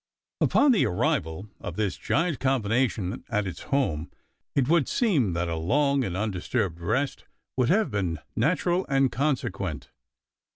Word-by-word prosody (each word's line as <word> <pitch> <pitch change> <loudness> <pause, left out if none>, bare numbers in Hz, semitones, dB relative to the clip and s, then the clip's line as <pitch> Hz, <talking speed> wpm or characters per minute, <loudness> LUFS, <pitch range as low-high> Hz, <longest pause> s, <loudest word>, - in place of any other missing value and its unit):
Upon 280 0 +4
the 230 - +4
arrival 90 +2 -1
of - - -6
this 105 -4 -1
giant 165 -1 0
combination 115 -6 0
at 105 0 0
its 90 -3 -6
home, 110 - 0 0.5
it 135 -3 +2
would 165 -2 +3
seem 150 - +2
that 85 +1 -1
a 85 - -2
long 140 - +2
and 95 -5 -3
undisturbed 95 -4 -1
rest 120 +11 -1 0.3
would 130 -1 +2
have 195 - +3
been 95 -6 -1 0.2
natural 180 +1 +1
and 135 -2 +3
consequent. 95 - -2
115 Hz, 140 wpm, -26 LUFS, 90-140 Hz, 0.5 s, Upon